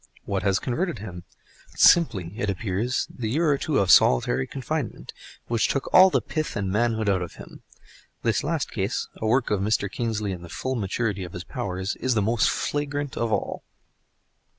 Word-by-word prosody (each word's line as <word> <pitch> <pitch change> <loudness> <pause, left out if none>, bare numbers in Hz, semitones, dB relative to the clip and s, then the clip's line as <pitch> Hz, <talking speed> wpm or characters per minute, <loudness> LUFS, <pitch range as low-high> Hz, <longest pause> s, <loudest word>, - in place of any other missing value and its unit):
What 100 -1 -1
has 95 -1 +2
converted 150 - -2
him? 90 -4 -8 0.5
Simply, 100 - +4
it 110 -3 -2
appears, 105 +5 -1
the 115 -4 -3
year 155 +6 +2
or 140 - +2
two 150 -3 0
of 95 -2 +3
solitary 65 +1 +4
confinement—which 130 -4 -4
took 135 - -2
all 190 +1 +9
the - - 0
pith 155 -1 -3
and 100 -4 -2
manhood 110 0 +1
out 95 -2 +2
of 90 - -6
him. - - -12 0.6
This 115 -2 +1
last 160 -1 -2
case, 100 +2 -2
the 110 - -2
work 120 +1 +2
of 105 -2 +1
Mr. 105 -1 0
Kingsley 110 -4 -2
in 90 -2 -6
the 85 - -10
full 130 +8 -3
maturity 105 -2 -2
of 90 - -8
his 90 - -6
powers, 95 -5 -4
is 130 -2 0
the 110 - +2
most 115 +2 +2
flagrant 145 -1 -2
of 115 -1 -1
all. - - -2
110 Hz, 180 wpm, -25 LUFS, 95-130 Hz, 0.6 s, all